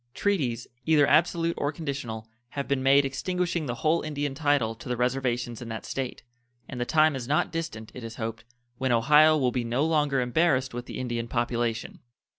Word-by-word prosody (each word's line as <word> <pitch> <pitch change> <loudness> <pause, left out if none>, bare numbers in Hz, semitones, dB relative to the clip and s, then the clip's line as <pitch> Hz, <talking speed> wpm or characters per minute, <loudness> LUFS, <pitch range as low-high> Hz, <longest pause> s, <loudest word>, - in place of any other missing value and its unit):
Treaties, 135 - 0 0.2
either 155 -3 +5
absolute 165 +2 +3
or 145 - 0
conditional, 135 -8 -5 0.2
have 140 +2 -4
been 140 -1 0
made 140 +1 +5
extinguishing 175 +2 -2
the 120 - -2
whole 160 +2 +3
Indian 145 -2 -3
title 140 -6 +1
to 115 - -10
the 125 - -1
reservations 125 -2 -1
in 120 - -7
that 110 0 -5
State, 130 -3 -4 0.4
and 125 -3 -6
the - - 0
time 155 +2 +3
is 125 -3 -5
not 150 +2 +1
distant, 165 -10 -5
it 125 - -9
is 115 0 -7
hoped, 115 -2 -5 0.4
when 130 -1 0
Ohio 150 +7 +6
will 130 -4 +1
be 125 0 -1
no 120 +5 0
longer 150 -4 +2
embarrassed 130 +1 +1
with 120 0 -6
the - - -6
Indian 120 -2 -3
population. 120 -1 -2
135 Hz, 190 wpm, -27 LUFS, 120-150 Hz, 0.4 s, Ohio